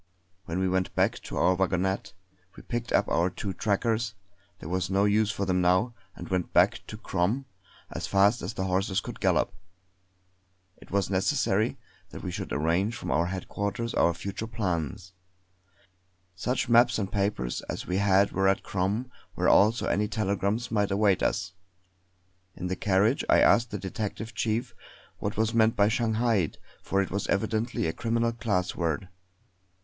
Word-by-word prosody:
When 85 Hz, -, -3 dB
we 95 Hz, 0 st, +1 dB
went 95 Hz, 0 st, -1 dB
back -, -, +2 dB
to -, -, -5 dB
our 90 Hz, -, +4 dB
wagonette, 95 Hz, -2 st, -1 dB, 0.4 s
we -, -, -12 dB
picked 120 Hz, 0 st, -4 dB
up -, -, +3 dB
our 85 Hz, +2 st, +2 dB
two 95 Hz, +1 st, -5 dB
trackers 110 Hz, +2 st, 0 dB, 0.4 s
there -, -, -9 dB
was 90 Hz, +2 st, -1 dB
no 100 Hz, +1 st, +2 dB
use 105 Hz, +1 st, +3 dB
for 100 Hz, -1 st, -2 dB
them 90 Hz, -1 st, +1 dB
now 95 Hz, +7 st, +2 dB, 0.2 s
and -, -, -8 dB
went 90 Hz, -2 st, -1 dB
back -, -, +4 dB
to -, -, -7 dB
Crom 110 Hz, +10 st, -1 dB, 0.5 s
as -, -, -4 dB
fast 100 Hz, +4 st, +3 dB
as 115 Hz, -, -5 dB
the 95 Hz, -, -2 dB
horses 95 Hz, +1 st, 0 dB
could -, -, -8 dB
gallop. -, -, +2 dB, 1.2 s
It -, -, -16 dB
was 100 Hz, 0 st, 0 dB
necessary 105 Hz, +2 st, +1 dB, 0.3 s
that -, -, -9 dB
we -, -, -3 dB
should -, -, -5 dB
arrange 85 Hz, +9 st, +1 dB
from -, -, -6 dB
headquarters 100 Hz, -, -2 dB
our 85 Hz, -, +3 dB
future 100 Hz, +5 st, -5 dB
plans; 95 Hz, -4 st, -3 dB, 1.2 s
such 125 Hz, +8 st, -1 dB
maps 120 Hz, +1 st, +5 dB
and 100 Hz, -3 st, -3 dB
papers 100 Hz, -12 st, -1 dB
as -, -, -4 dB
we 90 Hz, -, -1 dB
had 100 Hz, 0 st, +3 dB
were 95 Hz, 0 st, +1 dB
at 95 Hz, +1 st, +2 dB
Crom, 100 Hz, +6 st, -1 dB, 0.3 s
where -, -, +2 dB
also 110 Hz, +4 st, +4 dB
any 105 Hz, +1 st, +1 dB
telegrams 105 Hz, +2 st, -1 dB
might 105 Hz, -3 st, +1 dB
await 100 Hz, -1 st, +2 dB
us. 90 Hz, -, -1 dB, 1.0 s
In 90 Hz, -, -6 dB
the 90 Hz, +1 st, -1 dB
carriage 100 Hz, +6 st, +2 dB
I -, -, +6 dB
asked 120 Hz, 0 st, +4 dB
the 105 Hz, -, -4 dB
detective 105 Hz, +3 st, -5 dB
chief 110 Hz, 0 st, -1 dB, 0.5 s
what 100 Hz, +2 st, -3 dB
was 110 Hz, +1 st, +1 dB
meant 115 Hz, 0 st, +3 dB
by 105 Hz, -1 st, +4 dB
'Shanghaied' 110 Hz, -5 st, +1 dB, 0.2 s
for 100 Hz, 0 st, +1 dB
it -, -, -7 dB
was 100 Hz, +2 st, -2 dB
evidently 110 Hz, +3 st, 0 dB
a 80 Hz, -, -1 dB
criminal 115 Hz, 0 st, 0 dB
class 105 Hz, -6 st, -1 dB
word. 85 Hz, 0 st, -1 dB
100 Hz, 165 wpm, -27 LUFS, 95-110 Hz, 1.2 s, I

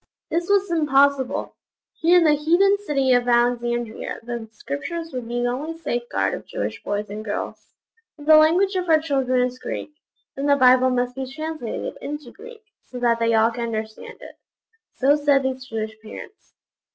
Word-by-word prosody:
This 340 Hz, +2 st, -1 dB
was 400 Hz, -2 st, +2 dB
impossible. 280 Hz, -4 st, +2 dB, 0.4 s
Here 340 Hz, +2 st, +5 dB
in 350 Hz, -, +5 dB
the 310 Hz, -2 st, +5 dB
heathen 345 Hz, +7 st, +3 dB
city 275 Hz, -3 st, +2 dB
of 245 Hz, 0 st, +2 dB
Alexandria 240 Hz, -1 st, 0 dB
the 235 Hz, -1 st, -6 dB
Scriptures 325 Hz, -, -5 dB
would 250 Hz, -2 st, -5 dB
be 240 Hz, +1 st, -2 dB
the 245 Hz, -, +1 dB
only 300 Hz, +7 st, -4 dB
safeguard 240 Hz, -7 st, -2 dB
of -, -, -7 dB
Jewish -, -, -4 dB
boys 205 Hz, +1 st, -3 dB
and 215 Hz, +1 st, -6 dB
girls. 210 Hz, -1 st, -6 dB, 0.4 s
'If 290 Hz, -, -12 dB
the 310 Hz, 0 st, +7 dB
language 340 Hz, +6 st, +4 dB
of 360 Hz, -2 st, -2 dB
our 320 Hz, -, +6 dB
children 265 Hz, -5 st, +1 dB
is 250 Hz, 0 st, -6 dB
Greek, -, -, -5 dB, 0.4 s
then 275 Hz, +1 st, -2 dB
the 285 Hz, -, +5 dB
Bible 255 Hz, -1 st, +5 dB
must 250 Hz, 0 st, 0 dB
be 265 Hz, -1 st, -5 dB
translated 310 Hz, -5 st, -5 dB
into 295 Hz, -4 st, -6 dB
Greek, 455 Hz, +1 st, -13 dB, 0.2 s
so 250 Hz, -, -10 dB
that 235 Hz, -1 st, +1 dB
they 230 Hz, 0 st, +2 dB
all 225 Hz, +1 st, +4 dB
can 235 Hz, 0 st, -4 dB
understand 220 Hz, -1 st, -6 dB
it.' -, -, -12 dB, 0.6 s
So 275 Hz, +2 st, +3 dB
said 285 Hz, -2 st, +2 dB
these 260 Hz, 0 st, -3 dB
Jewish 220 Hz, -1 st, -4 dB
parents. 220 Hz, -, -12 dB
260 Hz, 175 wpm, -22 LUFS, 240-315 Hz, 0.6 s, the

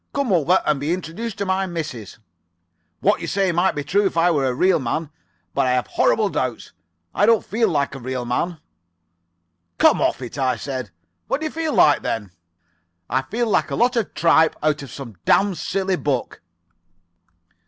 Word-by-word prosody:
Come 275 Hz, -7 st, +1 dB
over 175 Hz, +2 st, +3 dB
and 150 Hz, -2 st, +1 dB
be 150 Hz, +4 st, -1 dB
introduced 190 Hz, +5 st, -6 dB
to 200 Hz, -, -2 dB
my 190 Hz, 0 st, 0 dB
missus.' 155 Hz, -, -6 dB, 0.8 s
"'What 205 Hz, +2 st, +2 dB
you -, -, -4 dB
say 195 Hz, -2 st, +1 dB
might 175 Hz, +3 st, +1 dB
be 145 Hz, -, -3 dB
true 195 Hz, +8 st, +2 dB
if 180 Hz, -, -5 dB
I 175 Hz, +1 st, +4 dB
were 140 Hz, -5 st, +1 dB
a 125 Hz, -, 0 dB
real 180 Hz, +4 st, +3 dB
man, 145 Hz, +5 st, -3 dB, 0.4 s
but -, -, +1 dB
I 125 Hz, -, +2 dB
have 125 Hz, -1 st, +1 dB
horrible 215 Hz, -2 st, +2 dB
doubts. 130 Hz, -, -3 dB, 0.4 s
I 205 Hz, -, +2 dB
don't 230 Hz, -1 st, +4 dB
feel 225 Hz, +1 st, +1 dB
like 145 Hz, -5 st, 0 dB
a 135 Hz, -, -7 dB
real 130 Hz, 0 st, -4 dB
man.' 165 Hz, +8 st, -1 dB, 1.2 s
"'Come -, -, +4 dB
off -, -, +1 dB
it,' 125 Hz, +3 st, -7 dB
I 130 Hz, -2 st, +1 dB
said. 130 Hz, -1 st, -5 dB, 0.4 s
'What 275 Hz, -, 0 dB
do -, -, -2 dB
you 310 Hz, -, -2 dB
feel 320 Hz, -2 st, -2 dB
like, 145 Hz, -, +5 dB
then?' 105 Hz, -4 st, -3 dB, 0.8 s
"'I 130 Hz, +2 st, +2 dB
feel 240 Hz, +2 st, 0 dB
like 215 Hz, -, +1 dB
a -, -, -2 dB
lot 250 Hz, +2 st, +2 dB
of 230 Hz, -4 st, -2 dB
tripe 160 Hz, -1 st, +4 dB
out 150 Hz, -1 st, +1 dB
of 140 Hz, -, -9 dB
some 120 Hz, -8 st, -9 dB
damn 200 Hz, 0 st, +3 dB
silly 190 Hz, +1 st, -1 dB
book. 135 Hz, -7 st, -2 dB
165 Hz, 190 wpm, -21 LUFS, 135-195 Hz, 1.2 s, like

